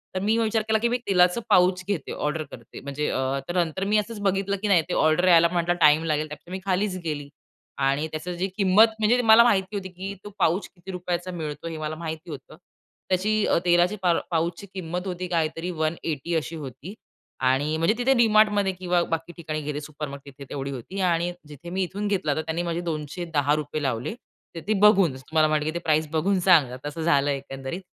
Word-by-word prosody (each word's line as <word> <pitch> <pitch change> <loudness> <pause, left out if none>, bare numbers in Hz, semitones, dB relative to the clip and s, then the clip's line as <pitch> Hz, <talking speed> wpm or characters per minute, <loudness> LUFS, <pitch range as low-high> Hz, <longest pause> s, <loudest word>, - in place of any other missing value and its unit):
तर 185 - 0
मी 220 +3 +2
विचार 225 -1 +1
केला, 220 0 +3
की 235 - +1
मी 245 - +1
तेलाचं 180 +2 +3
पाउच 180 0 +4
घेते 190 -9 -3
ऑर्डर 150 +1 -2
करते. 115 -1 -11
म्हणजे 140 +2 -3
अ, 130 +1 -1
तर 180 - -2
नंतर 170 +4 -4
मी 215 - +5
असंच 210 0 -2
बघितलं 195 0 0
की 215 - -1
नाही 190 -5 +5
ते - - -1
ऑर्डर 155 +4 +3
यायला 170 -1 +7
म्हटला 175 0 +1
टाईम 150 +1 +6
लागेल 155 -1 0
त्यापेक्षा 155 +3 -11
मी 190 - -4
खालीच 190 0 0
गेली 145 -3 -4 0.6
आणि 145 +3 0
त्याची 175 +3 -5
जी 190 +2 0
किंमत, 200 +3 +6
म्हणजे 235 +3 +3
मला 225 0 +7
माहिती 200 -3 +1
होती, 190 -2 -4
की 190 +2 -6
तो 205 - -8
पाउच 180 +2 +1
किती 180 +2 -9
रुपयाचा 180 0 -3
मिळतो 160 -2 -5
हे 165 -1 -5
मला 155 0 -4
माहिती 160 0 -6
होतं. 145 +2 -10 0.5
त्याची 185 +3 +1
अ, - - +2
तेलाची 175 +3 +3
पार 175 -2 +3
पाउच 170 +1 0
ची 200 - -10
किंमत 180 +1 -4
होती 180 0 -4
काहीतरी 165 0 -1
180 160 0 -2
अशी 160 +1 -2
होती 145 - -8 0.6
आणि 145 +4 +1
म्हणजे 165 +6 +2
तिथे 255 +2 +3
Dmartमध्ये 210 -3 +4
किंवा 180 -1 0
बाकी 165 +1 -2
ठिकाणी 155 -2 -4
गेले 150 0 -4
सुपरमार्केट 140 -2 -8
तिथे 140 - -9
तेवढी 140 0 -4
होती 140 +10 -7
आणि 175 -1 +1 0.2
जिथे 150 +3 -10
मी 190 +1 -1
इथून 205 +3 -3
घेतला, 185 -8 0
तर 155 - -1
त्यांनी 160 +2 -3
माझे 170 0 -2
₹210 155 -2 -2
लावले. 125 - -2 0.4
तर 165 - -4
ते 215 - +2
बघून, 195 -9 +5
तुम्हाला 155 +4 +1
म्हणलं 155 -1 0
की 155 - -2
ते 170 - -2
प्राइज 155 -2 +1
बघून 185 +5 +1
सांगा 160 -9 +4
तसं 150 +3 -5
झालं 145 -3 +2
एकंदरीत 135 +4 -5
170 Hz, 205 wpm, -25 LUFS, 155-190 Hz, 0.6 s, यायला